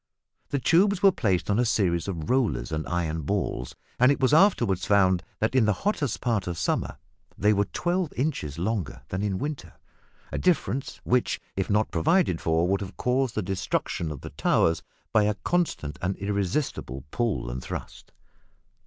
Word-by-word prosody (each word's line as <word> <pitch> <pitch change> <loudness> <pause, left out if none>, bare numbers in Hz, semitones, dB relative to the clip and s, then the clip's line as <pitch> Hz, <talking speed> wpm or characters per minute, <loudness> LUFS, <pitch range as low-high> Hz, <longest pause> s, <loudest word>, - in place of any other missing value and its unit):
The 140 - 0
tubes 180 +8 +3
were 195 - +8
placed 95 - 0
on 105 +2 +1
a - - +4
series 90 -7 +1
of 85 -6 -4
rollers 125 -7 +1
and 80 0 -3
iron 80 -2 -1
balls, 75 -6 -2 0.2
and 125 +3 +6
it 140 - 0
was 130 +2 +3
afterwards 120 - +4
found 95 -3 +4 0.2
that 110 +2 0
in 130 -4 +4
the 105 - +3
hottest 150 - 0
part 110 -7 0
of 85 -1 -3
summer 80 - -1 0.4
they 105 +1 +3
were 100 0 +2
twelve 175 - -1
inches 120 - -2
longer 95 - -2
than 95 - -2
in 100 -2 -1
winter 140 - -5 0.6
a - - -2
difference 140 -6 0
which, 125 0 +1 0.2
if 95 0 -2
not 105 +1 +2
provided 90 - +2
for, 80 +1 +2
would 100 +2 +1
have 95 - -7
caused 125 -1 0
the 110 - 0
destruction 90 -3 -2
of 75 - -7
the - - -8
towers 80 - +2 0.3
by 105 -1 +5
a 105 0 +1
constant 170 - -1
and 95 +2 -1
irresistible 100 - -2
pull 115 - -1
and 65 +1 -5
thrust! - - -7
100 Hz, 175 wpm, -26 LUFS, 85-130 Hz, 0.6 s, were